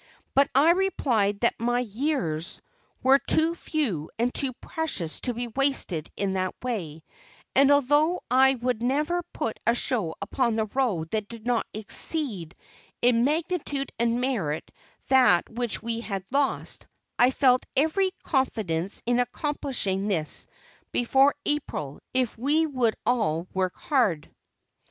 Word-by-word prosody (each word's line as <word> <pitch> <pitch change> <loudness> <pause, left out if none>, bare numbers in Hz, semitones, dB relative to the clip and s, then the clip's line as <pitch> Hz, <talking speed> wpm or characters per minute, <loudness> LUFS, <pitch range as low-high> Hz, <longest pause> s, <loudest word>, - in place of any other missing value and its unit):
But 275 +1 +4
I 295 +5 +6
replied 245 - +1
that 235 - +1
my 240 +1 +1
"years" 215 - -2 0.4
were 270 +1 +6
too 320 +3 +2
few 250 - -2
and 240 +2 0
too 270 -2 +1
precious 245 - -2
to 245 -2 0
be 240 +1 -3
wasted 250 - 0
in 195 -1 -1
that 185 -1 -2
way; 170 -11 -4 0.5
and 275 +1 +5
although 290 +5 +3
I 265 +1 +5
would 245 -2 -2
never 300 +8 0
put 225 - -4
a 235 - +4
show 215 -11 0
upon 235 +3 0
the 220 -1 0
road 205 -9 -1
that 215 -2 -2
did 230 0 -11
not 240 -2 0
exceed 215 - -1 0.5
in 240 -1 +4
magnitude 300 -2 -1
and 235 0 +1
merit 205 - -2 0.4
that 250 -10 +5
which 235 -1 -1
we 230 0 -2
had 195 -5 -5
lost, 280 0 -1 0.3
I 245 - +6
felt 255 -1 +3
every 320 +7 +2
confidence 200 - -1
in 245 +1 +2
accomplishing 245 -7 -1
this 165 -7 -1 0.4
before 270 +4 +3
April, 155 - -3
if 255 -3 0
we 300 +6 +2
would 255 -7 0
all 205 -10 +1
work 185 -1 -1
hard. 215 - 0
245 Hz, 135 wpm, -26 LUFS, 200-275 Hz, 0.5 s, I